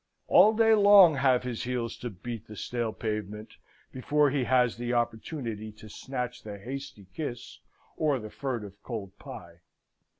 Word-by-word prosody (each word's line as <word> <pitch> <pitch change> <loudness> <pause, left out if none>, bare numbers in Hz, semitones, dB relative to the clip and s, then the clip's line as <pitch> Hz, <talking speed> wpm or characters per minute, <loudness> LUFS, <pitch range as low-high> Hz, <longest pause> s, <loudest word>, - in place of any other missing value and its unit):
All 215 +1 +6
day 225 0 +5
long 200 -5 +8
have 130 -2 +3
his 125 -2 -4
heels 125 -2 -3
to 120 - -5
beat 115 +3 -8
the 105 - -10
stale 115 +2 -3
pavement 105 -1 -5 0.3
before 145 +2 +2
he 135 -3 0
has 125 -2 +2
the 120 +1 -2
opportunity 115 -1 -3
to 110 0 -13
snatch 125 +2 -5
the 105 -1 -8
hasty 135 -1 -8
kiss 135 -7 -6 0.4
or 150 -3 +2
the 110 -2 -8
furtive 105 -7 -5
cold 105 -6 -6
pie. 85 0 -10
120 Hz, 155 wpm, -28 LUFS, 110-135 Hz, 0.4 s, long